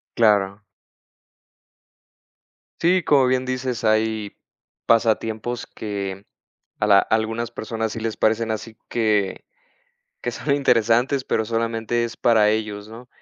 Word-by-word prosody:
Claro. 105 -2 +2 2.2
Sí, 180 +2 +3
como 145 -5 +4
bien 130 0 +1
dices, 130 -1 -3
hay 110 -1 0 0.5
pasatiempos 115 +1 +1
que 100 -2 -6 0.5
a 105 - +1
la 100 -1 +7
algunas 110 +3 0
personas 110 -1 -4
sí 115 - -5
les 110 -1 -3
parecen 110 +1 +1
así 110 0 -5
que 105 -4 0 0.8
que - - -1
son 140 - -1
interesantes, 125 0 +2
pero, 110 - 0
solamente, 115 +1 -1
es 115 -1 -6
para 110 -3 +4
ellos, 105 -1 -3
¿no? 120 +3 -12
110 Hz, 120 wpm, -22 LUFS, 110-120 Hz, 2.2 s, la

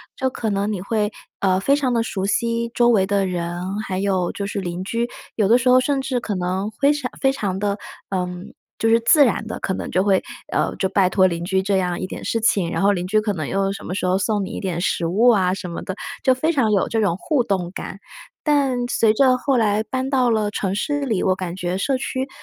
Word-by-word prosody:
就 260 - 0
可 230 -3 -3
能 200 +1 0
你 205 - -3
会， 210 +1 -1 0.3
呃， 185 -1 +2
非 275 +8 +3
常 270 -4 0
地 230 - +2
熟 195 -4 -3
悉 230 +3 0
周 240 0 +4
围 205 -5 +4
的 200 -1 +1
人， 180 +2 -3
还 190 -3 -4
有 190 -3 0
就 200 - -4
是 205 - -3
邻 175 0 -4
居， 235 +3 -1 0.3
有 210 -3 +2
的 230 +4 +6
时 250 0 -1
候 255 0 +7
甚 280 +1 0
至 260 -2 -1
可 215 -4 -3
能 185 +3 -2
非 285 +1 +4
常 280 -4 -4
非 270 - +4
常 200 -8 -2
地， 200 0 -1 0.3
呃， 185 -2 -1 0.5
就 225 - +1
是 230 +1 +5
自 285 +6 +6
然 230 - 0
地， 220 - -5
可 190 - -2
能 - - -5
就 185 - +2
会， 195 -2 +3 0.3
呃， - - +1
就 190 - 0
拜 190 -2 +3
托 185 0 +4
邻 170 -1 -3
居 190 +1 +1
这 195 0 +1
样 180 -2 -1
一 - - -3
点 - - -7
事 230 - 0
情， 205 -7 +2
然 - - -1
后 200 +1 +4
邻 180 -3 -2
居 215 +3 +3
可 210 -1 -1
能 155 -6 -4
又 195 +3 0
什 - - -9
么 180 - -4
时 190 - -2
候 185 +1 +2
送 205 +1 0
你 - - -7
一 - - -5
点 180 -3 -3
食 175 - 0
物 210 +9 +4
啊 190 -5 +3
什 185 -2 -5
么 170 - -5
的， 190 - -5 0.3
就 260 - +5
非 310 +6 0
常 260 -9 +2
有 200 -2 +2
这 225 - 0
种 200 -5 +1
互 280 +3 0
动 185 -5 -2
感。 190 - -7 0.5
但 270 -5 +1
随 225 -3 +3
着 255 +2 +4
后 265 +1 +1
来 215 -2 +2
搬 260 +3 -3
到 255 -3 +2
了 215 -2 +1
城 195 -2 -2
市 290 +7 -1
里， 225 -9 0
我 185 - +2
感 180 -2 -5
觉 180 0 -2
社 265 +7 0
区， 260 0 -3
205 Hz, 275 characters per minute, -21 LUFS, 190-245 Hz, 0.5 s, 候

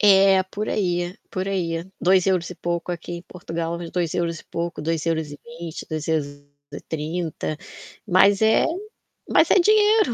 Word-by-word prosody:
É, 195 -2 +6
por 210 +1 -2
aí, 175 -2 -1 0.2
por 185 0 -2
aí, 185 -4 -1 0.3
€2 185 -1 +3
e - - -6
pouco 175 +1 -2
aqui 175 0 -6
em 170 - -7
Portugal, 170 -2 -4 0.2
€2 170 -1 -1
e - - -19
pouco, 170 -1 -4
€2,20, 160 0 -3
€2,30 155 +1 -4 0.5
mas 195 +1 +5
é 220 0 +5 0.6
mas - - +4
é 385 - +6
dinheiro. 425 - +4
175 Hz, 125 wpm, -23 LUFS, 160-190 Hz, 0.6 s, É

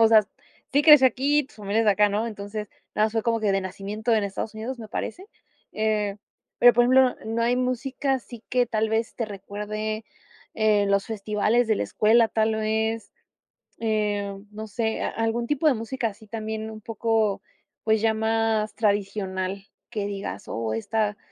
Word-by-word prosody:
O 225 - +7
sea, 215 -2 +6 0.5
sí 285 +2 +4
creció 295 -4 +9
aquí, 280 +3 +2
pues, 275 - -20
su 210 - -13
familia 200 +2 0
es - - -1
de 210 - +5
acá, 205 +1 +4
¿no? 210 +3 -1
Entonces, 210 -1 -6 0.3
nada 215 - +4
más 220 - -6
fue 225 - 0
como 230 0 +1
que 210 -3 +1
de 195 - +2
nacimiento 200 +4 -3
en 215 -2 +3
Estados 200 +2 -4
Unidos, 235 +3 -5
me 220 - -8
parece. 360 - -5 0.4
Eh, 215 -2 0 0.4
pero, 245 0 +8
por 240 - +4
ejemplo, 255 +1 +5
no 225 +1 -1
hay 240 +1 +3
música 255 +2 -1
así 240 -3 -7
que 250 -1 +2
tal 220 -1 0
vez 225 +1 -1
te 235 - -2
recuerde, 215 +2 -5 0.5
eh, 215 -2 +3
los 200 0 +1
festivales 215 +2 +1
de 220 - +3
la - - -1
escuela, 225 +2 +4
tal 220 0 +1
vez, 220 0 -1 0.7
eh, 205 -2 0 0.2
no 215 +1 -7
sé, 220 +1 -2
a - - 0
algún 225 +1 -1
tipo 295 +3 +1
de 295 - +6
música 230 +1 -2
así 215 0 -10
también 220 0 -4
un 215 0 -10
poco, 220 -2 0 0.4
pues, 220 0 +3
ya 225 0 +3
más 220 -1 0
tradicional 195 -2 -1 0.3
que 215 -4 -3
digas: 195 - -5
"Oh, 115 -1 -2
esta 210 - -1
220 Hz, 185 wpm, -25 LUFS, 210-230 Hz, 0.7 s, creció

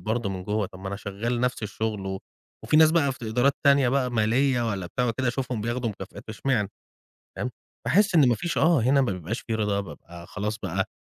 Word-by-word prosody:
برضه 110 -1 -1
من 95 -1 -5
جوّه، 105 0 0
طَب 95 - -13
ما 95 - -5
أنا 100 - -4
شغّال 110 +4 -3
نَفْس 125 -2 -1
الشُغل 105 -1 -3
و 95 0 -3 0.5
وفي - - +2
ناس 155 0 +7
بقى 150 -5 +2
في - - -12
ت - - -17
إدارات 120 +5 +2
تانية 140 -2 +5
بقى 130 -1 +1
مالية 120 +2 +2
والّا 95 -4 -3
بتاع 125 +8 -1
وكده 120 +2 0
أشوفهم 125 -3 -2
بياخدوا 120 +2 -1
مكافآت 100 +2 -10
اشمعنى؟ 110 -2 0 0.7
فاهم، 125 - -2 0.4
باحس 200 +1 +3
إن 145 -6 +6
ما 120 - +4
فيش 165 +9 -2
آه، 160 -4 +4
هنا 135 +4 +4
ما 125 -7 +1
بيبقاش 90 +6 -4
في 115 - -4
رضا، 105 -2 0
بابقى 85 -3 -10
خلاص 105 +3 -3
بقى 95 -2 -2
115 Hz, 220 wpm, -26 LUFS, 100-130 Hz, 0.7 s, ناس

